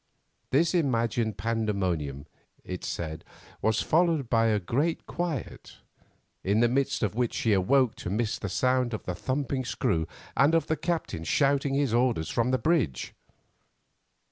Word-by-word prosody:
This 160 +7 +3
imagined 115 - +1
pandemonium, 95 -10 -1 0.4
it 90 -1 -6
said, 80 -1 -4 0.4
was 110 0 +1
followed 160 -6 +2
by 115 -1 +4
a 105 -2 +2
great 140 - -1
quiet, 170 -8 -5 0.7
in 100 +3 +2
the 120 - +5
midst 130 0 0
of 105 - 0
which 120 +1 -1
she 115 -8 +2
awoke 110 +6 +3
to - - -5
miss 110 +3 -1
the 100 - -4
sound 125 +2 +1
of - - -7
the 90 - -3
thumping 130 +6 -2
screw 80 -9 -1 0.3
and 145 +4 +4
of 165 - +2
the 160 - 0
captain 165 - -2
shouting 135 - +2
his 140 -5 +1
orders 120 -9 +1
from 120 +1 +1
the 130 - +2
bridge. 125 - 0
120 Hz, 150 wpm, -28 LUFS, 100-140 Hz, 0.7 s, the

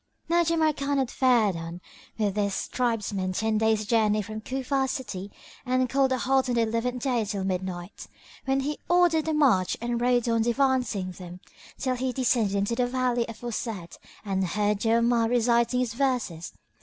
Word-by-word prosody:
Now 340 +1 +4
Jamrkan 310 -4 +1
had 265 -3 0
fared 235 -7 +3
on 165 +1 -6 0.4
with 205 -3 0
his 200 -2 -1
tribesmen 210 -6 -1
ten 215 +2 0
days' 220 -1 +2
journey 215 -1 +2
from 215 +2 -7
Cufa 265 +2 -1
city 200 -7 -5 0.3
and 255 0 +1
called 265 +1 +2
a 260 - +2
halt 265 +1 +1
on 245 - +1
the 235 - +3
eleventh 230 +2 -1
day 245 -4 +1
till 200 -2 -3
midnight, 185 -1 -4 0.4
when 270 0 +1
he 295 +2 -3
ordered 345 -3 +3
a 315 - +1
march 235 -12 +3
and 235 0 -2
rode 245 -1 +2
on 230 -1 +2
devancing 240 -5 +1
them 180 -1 -10 0.4
till 260 -1 -1
he 260 +1 -1
descended 240 -5 +1
into 200 +3 0
the 245 0 +1
valley 245 -2 0
aforesaid 225 -5 -5 0.3
and 190 -1 0
heard 205 +3 0
Jawamard 230 +1 +2
reciting 235 +1 +2
his 240 -3 -2
verses. 240 -10 -1
235 Hz, 170 wpm, -26 LUFS, 205-255 Hz, 0.4 s, Now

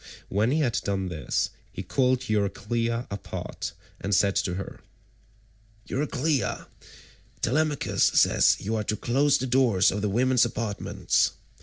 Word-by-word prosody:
When 105 +4 +1
he 155 +4 +1
had 120 -4 +1
done 95 -2 -2
this, 80 -3 -2 0.2
he - - -6
called 130 -1 +1
Euryclea 115 +3 -1
apart 100 - -5 0.3
and 100 0 0
said 100 0 +3
to 90 - 0
her, 95 - -7 1.1
"Euryclea, 145 +1 -1 0.8
Telemachus 150 +3 +1
says - - +4
you 110 +3 -2
are 110 - -1
to 105 - -1
close 140 +6 +2
the 130 - -3
doors 120 -7 +3
of 100 +2 -3
the 105 - 0
women's 125 +3 +3
apartments. 115 -3 0
115 Hz, 135 wpm, -26 LUFS, 100-130 Hz, 1.1 s, says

